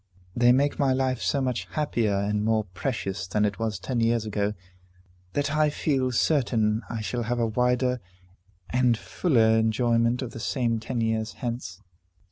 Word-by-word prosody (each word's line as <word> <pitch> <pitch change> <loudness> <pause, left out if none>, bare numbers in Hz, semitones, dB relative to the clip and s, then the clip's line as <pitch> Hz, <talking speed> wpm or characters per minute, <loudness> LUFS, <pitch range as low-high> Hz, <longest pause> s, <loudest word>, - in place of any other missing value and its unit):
They 120 0 +5
make 140 +3 +2
my 135 -2 +3
life 130 -2 0
so 140 - +1
much 125 -2 -1
happier 120 -9 0
and 105 +1 0
more 110 0 +2
precious 100 -1 -4
than 105 +2 +1
it 100 -2 -2
was 110 -3 -1
ten 120 +6 -3
years 115 -1 +1
ago, 105 0 -1 0.8
that 145 0 0
I 155 0 +3
feel 135 -3 0
certain 115 -5 +1
I 115 -1 -3
shall 120 +3 -2
have 120 +1 -1
a 120 - +1
wider 125 +2 +1 0.7
and 125 -2 +3
fuller 110 - +2
enjoyment 115 +2 +2
of 120 - -6
the - - -8
same 115 +2 0
ten 120 +2 -3
years 110 0 -1
hence." 115 -6 -5
115 Hz, 165 wpm, -26 LUFS, 110-125 Hz, 0.8 s, They